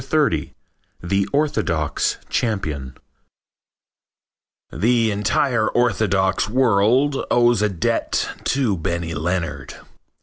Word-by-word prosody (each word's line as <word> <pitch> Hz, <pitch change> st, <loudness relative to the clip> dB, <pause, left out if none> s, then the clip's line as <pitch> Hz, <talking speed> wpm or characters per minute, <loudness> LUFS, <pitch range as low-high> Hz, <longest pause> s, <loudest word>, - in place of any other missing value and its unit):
XXX -, -, 0 dB, 0.5 s
THE 100 Hz, +2 st, 0 dB
ORTHODOX 140 Hz, -, 0 dB
CHAMPION 75 Hz, -, -2 dB, 1.8 s
The 115 Hz, 0 st, +2 dB
entire 110 Hz, +3 st, +1 dB
orthodox 100 Hz, -6 st, +1 dB
world 125 Hz, +4 st, +2 dB
owes 120 Hz, -2 st, +3 dB
a 105 Hz, -, +2 dB
debt 90 Hz, -4 st, -1 dB, 0.2 s
to 125 Hz, -8 st, +1 dB
Benny 85 Hz, 0 st, -3 dB
Leonard. 80 Hz, -3 st, -3 dB
100 Hz, 80 wpm, -21 LUFS, 85-120 Hz, 1.8 s, owes